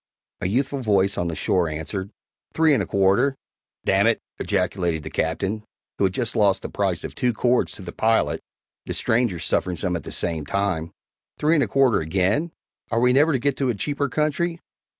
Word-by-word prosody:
A - - -1
youthful 135 +7 0
voice 100 -3 +2
on 85 - -1
the 85 - -3
shore 90 -1 +1
answered, 80 +6 -4 0.5
"Three 160 -2 +4
and 125 - +2
a 95 - -3
quarter!" 100 +8 +3 0.5
"D - - +2
nèt!" 100 +4 +4 0.2
ejaculated 85 -4 -1
the - - -7
Captain, 95 +7 -1 0.4
who 100 - +4
had 95 - 0
just 120 -2 -2
lost 100 -3 +3
the - - -4
price 95 -4 -1
of - - -6
two 125 -1 0
cords 120 +3 +1
to 95 - -8
the 85 - -6
pilot 110 +4 +1 0.5
the - - -2
strangers 110 -7 +1
suffering 90 -1 0
some 90 +1 -1
at 85 - -3
the - - -9
same 80 -3 -1
time 85 0 -1 0.5
"three 155 +2 +2
and 150 -4 +4
a - - 0
quarter 135 -5 +3
again! 95 - 0 0.4
Are 115 - +1
we 125 +1 +4
never 150 +5 +4
to 140 - +2
get 140 +2 0
to 135 -2 0
a 120 - 0
cheaper 140 +6 -2
country? 155 +4 0
105 Hz, 200 wpm, -23 LUFS, 90-130 Hz, 0.5 s, Three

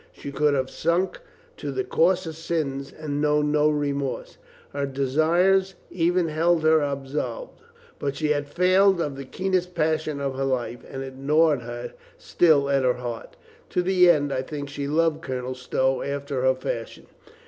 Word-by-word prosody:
She 140 - -8
could 150 0 +2
have 130 -1 -1
sunk 175 - 0 0.4
to - - -4
the 390 - -2
coarsest 175 - +1
sins 140 -5 -2
and 145 -2 -4
known 150 0 +2
no 150 0 +3
remorse. 140 -2 -2 0.3
Her 140 0 -1
desires 165 +8 +2 0.2
ever 175 0 +2
held 160 +1 +1
her 155 0 +5
absolved. 145 - -4 0.4
But 140 -1 -2
she 155 -2 -1
had 145 -1 0
failed 185 +3 +4
of 145 -4 -2
the 135 0 -7
keenest 180 +3 -2
passion 155 -2 0
of 140 -1 -2
her 135 +1 -3
life, 125 -2 -2
and 135 0 -5
it 135 -1 -8
gnawed 135 -5 +1 0.2
still 155 -5 +3
at 140 -1 +2
her 125 -1 +2
heart. 120 -2 -7 0.3
To 180 - 0
the 180 -1 +5
end, 145 -4 +3
I 130 - 0
think, 145 +1 -6
she 140 0 -4
loved 160 +1 +1
Colonel 130 -3 -4
Stow 130 +1 0
after 140 -1 -3
her 130 0 +3
fashion. 115 -3 -5
150 Hz, 165 wpm, -24 LUFS, 135-165 Hz, 0.4 s, her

